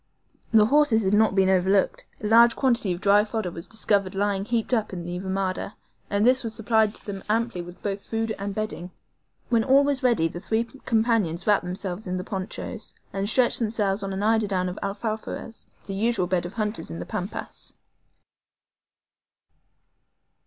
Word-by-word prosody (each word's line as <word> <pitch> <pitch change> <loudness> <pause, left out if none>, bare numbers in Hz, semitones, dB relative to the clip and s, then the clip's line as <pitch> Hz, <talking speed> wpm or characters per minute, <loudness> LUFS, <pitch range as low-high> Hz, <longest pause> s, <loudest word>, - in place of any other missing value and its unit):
The 220 -2 +6
horses 265 -3 +3
had 190 +1 +1
not 210 -2 +3
been 190 -1 +4
overlooked. 190 +1 +2 0.2
A - - 0
large 230 +2 +6
quantity 235 -7 +2
of 175 +1 -4
dry 205 +1 +5
fodder 215 -4 -3
was 165 0 -6
discovered 200 -3 +1
lying 200 0 0
heaped 230 +1 -1
up 220 -3 +1
in 175 -2 -5
the 175 0 -4
RAMADA, 190 +1 -3 0.3
and 205 +2 +1
this 255 +1 +5
supplied 220 -2 +1
them 195 -2 -7
amply 225 -3 0
with 175 +1 -12
both 200 -1 -2
food 225 +1 -2
and 200 0 -4
bedding. 215 -5 -4 0.6
When 230 -2 +3
all 270 +2 +5
was 280 -2 +1
ready 235 -10 +3
the 170 - -7
three 220 +5 0
companions 225 - -1
wrapped 205 -3 +3
themselves 185 +2 -5
in 180 0 -2
the 180 - -4
ponchos, 200 +3 -6 0.2
and 195 +1 0
stretched 250 0 +4
themselves 210 -3 0
on 195 0 -4
an 190 +1 -3
eiderdown 205 -4 +1
of 180 - -7
ALFAFARES, 220 +2 -4 0.2
the 195 - -5
usual 215 -1 +1
bed 175 -1 -1
of 175 - -11
hunters 215 -1 -3
on 80 - -6
the 90 - -6
Pampas. - - -6
210 Hz, 170 wpm, -25 LUFS, 190-225 Hz, 0.6 s, The